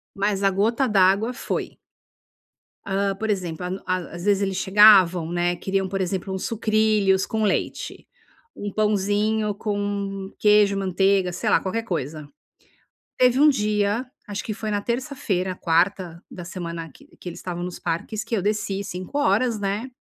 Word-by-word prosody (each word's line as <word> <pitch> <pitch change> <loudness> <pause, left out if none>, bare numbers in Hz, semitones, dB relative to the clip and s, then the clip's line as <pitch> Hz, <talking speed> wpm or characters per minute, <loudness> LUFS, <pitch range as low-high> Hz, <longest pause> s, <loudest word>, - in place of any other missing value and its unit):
Mas 200 0 0
a 195 - +4
gota 225 +7 +1
d'água 200 +3 +3
foi - - -4 1.1
Ah, 195 0 0
por 220 0 -2
exemplo, 180 -4 -3
a 180 - -2 0.2
a 185 - +1 0.2
às 175 +2 -7
vezes 205 -1 +2
eles 195 -1 -1
chegavam, 190 -4 +6
né, 175 0 0
queriam 190 +1 -1
por 195 +1 -3
exemplo 190 +1 -2
um 190 - -2
sucrilhos 215 -3 +1
com 220 0 -2
leite, 205 -3 -2 0.5
um 205 -1 -6
pãozinho 210 +1 +1
com 200 -1 -3
queijo, 210 -1 +4
manteiga 190 -1 +1
sei - - -2
lá, - - +4
qualquer 225 +4 -2
coisa. 155 - -4 0.9
Teve 250 +1 +4
um 300 +1 +7
dia, 210 -1 0 0.2
acho 205 0 -4
que 215 - -4
foi 215 0 -4
na 205 -1 0
terça-feira, 235 -7 -2
quarta 170 0 0
da 175 - -9
semana 170 -2 -6
que - - -19
que 180 - -7
eles 170 - -9
estavam 175 -1 -5
nos 180 0 -6
parques 175 +6 -3
que 230 +1 -2
eu 200 - 0
desci 200 -1 -1
5 185 +7 -6
horas, 250 -5 +2
né, 205 +5 -2
200 Hz, 160 wpm, -23 LUFS, 185-215 Hz, 1.1 s, um